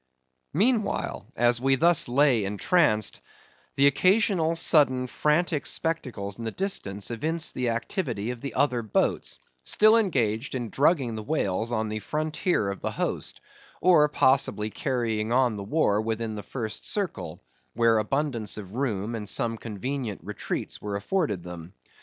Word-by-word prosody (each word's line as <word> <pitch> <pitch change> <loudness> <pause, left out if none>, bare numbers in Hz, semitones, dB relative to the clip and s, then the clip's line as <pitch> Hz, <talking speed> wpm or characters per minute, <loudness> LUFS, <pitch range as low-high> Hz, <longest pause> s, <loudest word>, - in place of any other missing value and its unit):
Meanwhile, 215 +4 0
as 120 +1 +3
we 135 +1 +3
thus 170 +3 +4
lay 125 -3 +3
entranced, 105 - +1 0.5
the 140 - +4
occasional 180 +2 +3
sudden 140 -6 +3
frantic 150 +3 0
spectacles 120 -11 -3
in - - -5
the 115 - -2
distance 105 - -2
evinced 155 +8 -2
the 125 -1 -1
activity 115 - -2
of 125 -2 -8
the 140 - -5
other 130 -3 +2
boats, 110 -3 0 0.2
still 215 - +4
engaged 130 - 0
in 120 -3 -3
drugging 140 -4 +2
the 110 - -4
whales 110 -4 -1
on 110 -2 -1
the 110 0 -3
frontier 155 - -1
of 100 - -8
the - - -1
host; - - -3 0.4
or 160 -4 +5
possibly 130 -6 +2
carrying 115 -4 -1
on 125 -2 +3
the 100 - -5
war 105 -3 +1
within 110 0 -3
the 105 - -5
first 110 +1 -5
circle, 100 - -4 0.3
where 115 -1 +4
abundance 115 -2 -1
of 100 -2 -8
room 115 -4 -2
and 105 -3 -5
some 115 +1 +1
convenient 115 +1 -5
retreats - - -5
were 105 -1 -4
afforded 105 - -1
them. 90 0 -9
120 Hz, 145 wpm, -26 LUFS, 110-150 Hz, 0.5 s, or